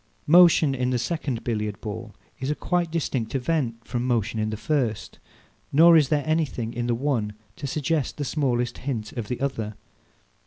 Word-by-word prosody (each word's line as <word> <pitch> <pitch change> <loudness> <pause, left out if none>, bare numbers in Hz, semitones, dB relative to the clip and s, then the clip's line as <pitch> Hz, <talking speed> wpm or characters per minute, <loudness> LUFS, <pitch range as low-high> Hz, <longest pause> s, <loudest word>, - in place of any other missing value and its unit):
Motion 165 -3 +6
in 125 -1 0
the 125 - +1
second 125 -1 -2
Billiard 105 -3 -2
ball 110 0 -7 0.2
is 135 - -3
a 150 - 0
quite 175 0 0
distinct 140 -7 -2
event 125 -4 -1
from 120 +1 -2
motion 115 -2 0
in 110 0 0
the 110 - -4
first; 125 -4 -2 0.5
nor 165 +4 +7
is 150 -5 +5
there 145 -2 +1
anything 155 -8 -1
in 120 0 -2
the 120 - +1
one 120 -5 -1 0.2
to 140 - -4
suggest 150 +1 -1
the 145 - -2
smallest 125 -5 -1
hint 120 -5 -4
of 115 -4 -5
the 125 - -3
other. 115 -6 -2
125 Hz, 180 wpm, -25 LUFS, 115-150 Hz, 0.5 s, nor